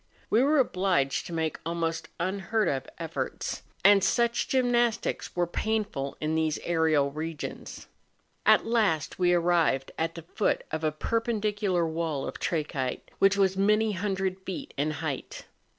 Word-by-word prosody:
We 225 Hz, -, +5 dB
were 295 Hz, +3 st, +3 dB
obliged 185 Hz, -, +1 dB
to 170 Hz, -, -7 dB
make 160 Hz, -1 st, -1 dB
almost 165 Hz, 0 st, -2 dB
unheard 195 Hz, +4 st, 0 dB
of 135 Hz, -2 st, -2 dB
efforts, -, -, -4 dB, 0.2 s
and 200 Hz, -1 st, +7 dB
such 235 Hz, +2 st, +2 dB
gymnastics 240 Hz, -3 st, +1 dB
are 175 Hz, -, +3 dB
painful 200 Hz, -7 st, -2 dB
in 155 Hz, +1 st, -1 dB
these 160 Hz, -1 st, +1 dB
aerial 160 Hz, -4 st, +2 dB
regions. 155 Hz, +1 st, -6 dB, 0.6 s
At -, -, +5 dB
last 210 Hz, -12 st, +1 dB
we 175 Hz, -1 st, +4 dB
arrived, 170 Hz, -6 st, +2 dB
at 165 Hz, +1 st, -1 dB
the 165 Hz, -, -8 dB
foot 185 Hz, +5 st, 0 dB
of 160 Hz, 0 st, -3 dB
a 155 Hz, -, +2 dB
perpendicular 210 Hz, -1 st, 0 dB
wall 160 Hz, -3 st, -2 dB
of -, -, -6 dB
trachyte 145 Hz, -6 st, -2 dB
which 195 Hz, 0 st, +4 dB
was 190 Hz, -1 st, +3 dB
many 210 Hz, +3 st, +3 dB
hundred 190 Hz, -1 st, -2 dB
feet 190 Hz, -1 st, -6 dB
in 145 Hz, +2 st, 0 dB, 0.2 s
height. 140 Hz, -4 st, -5 dB
175 Hz, 145 wpm, -28 LUFS, 160-210 Hz, 0.6 s, and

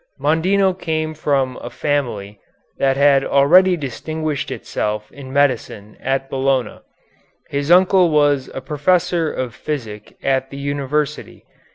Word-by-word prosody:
Mondino 185 Hz, +5 st, +2 dB
came 155 Hz, -3 st, -3 dB
from 140 Hz, -4 st, -1 dB
a -, -, -6 dB
family 120 Hz, -9 st, -3 dB, 0.4 s
that 135 Hz, -1 st, +2 dB
had 140 Hz, -1 st, +4 dB
already 175 Hz, +8 st, +4 dB
distinguished 155 Hz, +2 st, -4 dB
itself 105 Hz, 0 st, -4 dB
in 135 Hz, -2 st, -10 dB
medicine 125 Hz, -7 st, 0 dB
at 135 Hz, 0 st, -1 dB
Bologna. 135 Hz, -1 st, -1 dB, 0.7 s
His 140 Hz, +1 st, -2 dB
uncle 180 Hz, 0 st, +5 dB
was 145 Hz, -3 st, +2 dB
a 135 Hz, -, -4 dB
professor 160 Hz, +3 st, +1 dB
of 125 Hz, -3 st, -4 dB
physic 110 Hz, -9 st, -6 dB
at 135 Hz, -1 st, 0 dB
the 140 Hz, -, -9 dB
university. 140 Hz, +1 st, -3 dB
140 Hz, 125 wpm, -19 LUFS, 130-155 Hz, 0.7 s, uncle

